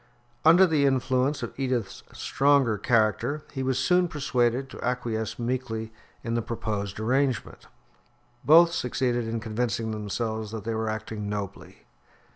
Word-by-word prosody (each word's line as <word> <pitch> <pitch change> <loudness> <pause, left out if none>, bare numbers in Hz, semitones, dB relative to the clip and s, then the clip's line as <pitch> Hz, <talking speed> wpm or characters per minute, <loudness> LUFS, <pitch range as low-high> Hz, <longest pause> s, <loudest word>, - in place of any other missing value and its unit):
Under 170 +4 +7
the 155 -5 +2
influence 130 +1 +1
of - - -5
Edith's 125 -6 -2
stronger 135 -6 +2
character 120 +6 +1
he 135 - -4
was 130 -1 0
soon 180 +7 +3
persuaded 130 -4 0
to - - -9
acquiesce 120 -3 -2
meekly 115 -2 -3 0.3
in 115 - -3
the 115 - +1
proposed 105 -3 -4
arrangement. 130 +1 -1 0.8
Both 170 +3 +7
succeeded 120 -1 -1
in 115 0 -2
convincing 110 0 -2
themselves 110 +1 -3
that 110 -3 -5
they 115 - -2
were 110 0 -1
acting 110 -1 -4
nobly. 100 -1 -6
120 Hz, 135 wpm, -26 LUFS, 110-135 Hz, 0.8 s, Under